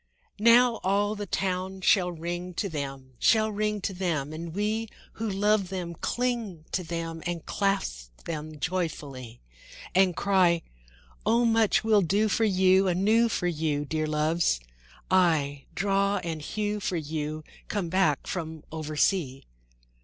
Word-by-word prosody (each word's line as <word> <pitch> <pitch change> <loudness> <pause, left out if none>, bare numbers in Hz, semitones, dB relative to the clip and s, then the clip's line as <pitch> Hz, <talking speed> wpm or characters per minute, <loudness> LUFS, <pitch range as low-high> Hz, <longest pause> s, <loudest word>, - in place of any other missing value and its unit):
II - - -6
Now 240 0 +7
all 200 +2 +2
the 205 -1 -5
town 190 +1 -2
shall 180 -1 +3
ring 175 +2 -5
to 200 - -1
them, 135 -5 -6
Shall 220 -1 +4
ring 210 0 -1
to 195 - -2
them, 160 -6 -2
And 165 +1 -6
we 215 +2 -1 0.2
who 225 0 -3
love 200 -1 +2
them 180 -2 -4
cling 230 -5 -2
to 185 - -1
them 165 -1 -4
And 170 -2 -4
clasp - - -2
them 155 -2 -5
joyfully; 140 -8 -4 0.5
And 185 -1 +4
cry, 180 -4 +3 0.6
"O 230 +3 +3
much 225 -2 +3
we'll 215 -2 +4
do 200 +5 +2
for 225 +2 +2
you 190 -1 +4
Anew 215 +6 +3
for 180 - -1
you, 155 -4 0
Dear 155 +1 -1
Loves!—aye, 150 - 0
draw 200 +1 +1
and 165 -2 -4
hew 210 +6 -2
for 185 -3 -2
you, 155 0 -4 0.2
Come 195 -5 -2
back 165 -6 +2
from 160 -3 -5
oversea." 155 -2 0
180 Hz, 140 wpm, -27 LUFS, 155-205 Hz, 0.6 s, Now